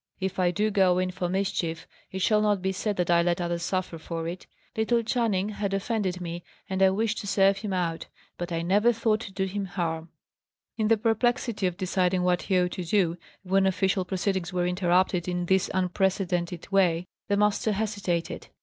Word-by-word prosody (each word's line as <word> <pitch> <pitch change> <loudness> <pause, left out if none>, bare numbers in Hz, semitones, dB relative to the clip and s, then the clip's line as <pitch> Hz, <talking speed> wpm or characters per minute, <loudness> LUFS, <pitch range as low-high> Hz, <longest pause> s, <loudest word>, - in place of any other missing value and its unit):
If 190 0 -3
I 180 -1 +3
do 210 +4 0
go 190 -3 +4
in 185 0 0
for 180 -1 -3
mischief, 185 -4 -1 0.3
it 190 0 -3
shall 215 -2 +4
not 210 -2 +2
be 190 - +1
said 205 +2 -2
that 175 -1 +1
I 170 0 +5
let 175 0 +1
others 170 -1 -2
suffer 185 -1 -2
for 165 0 -4
it. 175 +2 -6 0.3
Little 230 +1 +1
Channing 220 -4 0
had 200 -2 -2
offended 195 -3 -1
me, 170 -1 -5 0.2
and 190 0 -2
I 190 - +7
wished 220 +3 0
to 200 - -6
serve 195 0 +3
him 210 -1 -4
out. 170 -3 -2 0.3
But 175 0 -5
I 165 0 -1
never 205 +7 +3
thought 220 -1 +1
to 210 - -8
do 190 0 -1
him 195 +1 -3
harm." 165 -3 -3 0.7
In 220 -2 0
the 225 0 +4
perplexity 225 -1 +1
of 175 -1 -4
deciding 185 -1 +1
what 180 -1 +2
he 190 - +1
ought 180 0 +2
to 180 - -4
do, 170 -1 +1 0.3
when 190 +1 +2
official 190 0 +1
proceedings 190 -1 -2
were 180 -1 0
interrupted 180 0 +1
in 180 -1 -1
this 190 +1 +2
unprecedented 180 -1 -1
way, 180 -3 +3 0.2
the 200 - +1
master 210 +1 +2
hesitated. 200 -5 -2
190 Hz, 195 wpm, -27 LUFS, 175-205 Hz, 0.7 s, I